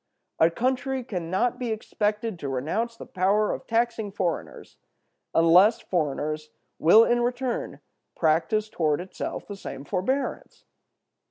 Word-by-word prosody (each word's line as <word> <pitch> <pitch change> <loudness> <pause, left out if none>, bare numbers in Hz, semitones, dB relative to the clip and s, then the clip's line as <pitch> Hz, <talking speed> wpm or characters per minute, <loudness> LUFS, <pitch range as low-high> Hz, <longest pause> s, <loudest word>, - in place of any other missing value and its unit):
A 160 - +6
country 260 +6 -1
can 180 -8 -5
not 240 +7 0
be 245 -2 -2
expected 210 -2 -2
to 140 - -4
renounce 200 - -2
the - - -9
power 200 +3 +1
of - - -7
taxing 230 -2 0
foreigners 185 -4 -4 0.6
unless 180 +7 +6
foreigners 155 -2 -2 0.3
will 210 +8 +7
in 240 +1 +2
return 245 0 -2 0.3
practice 175 +7 +1
toward 155 -8 0
itself 185 +2 -5
the 205 - -6
same 140 -7 -8
forbearance. 255 - -2
205 Hz, 125 wpm, -26 LUFS, 165-235 Hz, 0.6 s, will